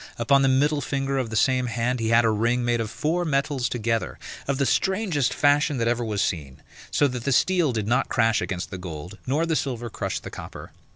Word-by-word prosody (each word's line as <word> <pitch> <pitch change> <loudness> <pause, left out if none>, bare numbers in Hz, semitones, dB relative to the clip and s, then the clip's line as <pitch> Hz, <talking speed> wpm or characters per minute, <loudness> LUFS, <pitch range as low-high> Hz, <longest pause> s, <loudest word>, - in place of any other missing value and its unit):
Upon 135 +4 +3
the 135 - +3
middle 145 +3 +2
finger 135 0 -1
of 125 -3 -2
the 110 - -5
same 125 +3 +2
hand 120 +2 -1
he 110 -1 -1
had 115 +1 +5
a 110 - +3
ring 120 +3 +1
made 120 -1 +1
of 110 - -3
four 155 +10 -1
metals 140 -4 0
together, 115 -1 -2 0.3
of 140 -1 0
the 140 - +1
strangest 185 - +1
fashion 145 0 +2
that 115 -1 0
ever 120 0 +1
was 105 -3 -1
seen; 70 -6 -4 0.3
so 145 - +3
that 125 -3 -5
the 140 - 0
steel 175 +2 +3
did 110 -3 -2
not 125 +3 +1
crash 115 -1 +2
against 90 -2 -4
the 95 - -6
gold, 90 +2 -8
nor 150 +6 +1
the 165 -1 0
silver 120 -4 -3
crush - - -3
the - - -9
copper. - - -9
125 Hz, 225 wpm, -24 LUFS, 115-140 Hz, 0.3 s, had